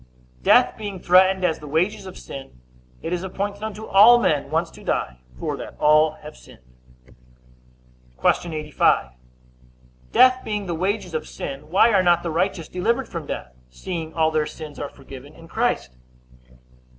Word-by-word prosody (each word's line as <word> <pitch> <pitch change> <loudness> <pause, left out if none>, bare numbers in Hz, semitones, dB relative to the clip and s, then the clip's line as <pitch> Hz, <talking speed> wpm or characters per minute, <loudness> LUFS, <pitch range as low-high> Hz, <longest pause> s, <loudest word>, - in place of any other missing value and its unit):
Death - - +4
being 205 -3 -5
threatened 185 +1 +4
as 160 - 0
the 150 - -10
wages 190 +7 -1
of 185 - -10
sin, 135 - -10 0.4
it 170 - -3
is 175 - -2
appointed 200 +2 -4
unto 220 0 -6
all 215 +5 +7
men 150 -11 0
once - - -1
to - - -14
die; 60 -1 -2 0.2
for - - -3
that - - -9
all 155 +1 +4
have 150 +1 -10
sinned. 60 - -17 1.6
Q. 175 - +1
85. 150 - +1 1.0
Death 255 0 +5
being 210 -2 -3
the 175 - -3
wages 185 +1 -2
of 155 0 -3
sin, 140 +2 -7
why 205 +6 +4
are 195 - +5
not 175 -1 +3
the 170 - -3
righteous 175 0 -1
delivered 230 +8 -1
from 165 -4 -7
death, 65 - -6 0.2
seeing 165 - -6
all 160 -1 +2
their 155 -1 0
sins 155 -2 -9
are 145 - -4
forgiven 135 +1 -13
in 165 - -14
Christ? 60 - -1
170 Hz, 160 wpm, -22 LUFS, 150-195 Hz, 1.6 s, all